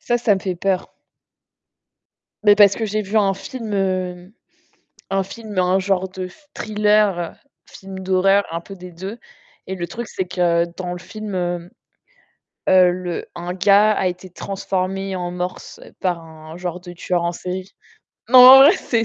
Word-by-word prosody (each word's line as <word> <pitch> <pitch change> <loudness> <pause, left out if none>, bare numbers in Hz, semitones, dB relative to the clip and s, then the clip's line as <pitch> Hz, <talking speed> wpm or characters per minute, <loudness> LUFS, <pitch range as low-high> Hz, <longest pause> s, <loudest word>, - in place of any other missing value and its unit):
Ça, 240 - 0
ça 230 -3 +3
me 190 - -4
fait 185 -1 -3
peur. 190 +1 -2 1.5
Mais 205 -1 +7
parce 200 -2 +6
que 225 - -3
j'ai 215 0 -2
vu 205 +2 -4
un 200 -2 +3
film, 225 +2 -7
heu, 185 -1 -2 0.8
un 195 0 0
film, 210 +1 -9
un 185 +1 +2
genre 190 -1 0
de 185 0 -6 0.2
thriller, 210 -4 +1 0.3
film 190 -1 -10
d'horreur, 190 +1 +2
un 165 +1 -3
peu 195 - -11
des 180 -1 -11
2 190 +7 -8 0.5
et 190 - -4
le 175 -2 -4
truc, 235 +4 -6
c'est 185 - -4
que 175 -2 +1
dans 180 -1 -4
le - - -6
film, 205 +2 -7
heu 175 -1 -3 1.0
heu, 185 -1 +6
le 180 -1 -4
un 175 +1 -5
gars 200 +3 +4
a 195 - -1
été 180 +1 -7
transformé 195 +1 -3
en 175 -1 -4
morse 180 +1 -6 0.2
par 180 -2 0
un 160 0 -12
genre 180 0 -5
de 175 0 -10
tueur 175 0 -1
en 170 - 0
série. 185 +2 -6 0.6
Non, 255 +1 +7
en 255 +1 +11
vrai 295 +5 +8
c'est 235 - -1
190 Hz, 170 wpm, -20 LUFS, 180-205 Hz, 1.5 s, en